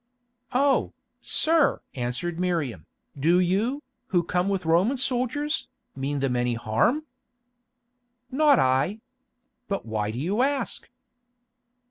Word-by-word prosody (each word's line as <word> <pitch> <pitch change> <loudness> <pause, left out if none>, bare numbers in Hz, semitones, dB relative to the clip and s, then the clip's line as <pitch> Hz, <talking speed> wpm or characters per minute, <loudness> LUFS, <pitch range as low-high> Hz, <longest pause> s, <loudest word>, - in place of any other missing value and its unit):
"Oh, 275 +1 +2 0.3
sir!" 320 -2 +2
answered 130 +8 -3
Miriam, 150 - -1 0.3
"do 165 +6 +3
you, 215 +11 +1 0.2
who 175 -6 +2
come 180 +3 0
with 190 -3 -1
Roman 180 +11 +3
soldiers, 265 +4 -1 0.3
mean 135 +1 -2
them 135 -2 0
any 120 -1 +1
harm?" 115 - +1 1.3
"Not 290 0 +5
I. 135 +12 +2 0.7
But 200 -1 -3
why 110 -2 -2
do 110 - -5
you 190 - 0
ask?" 275 0 -1
180 Hz, 110 wpm, -26 LUFS, -, 1.3 s, Not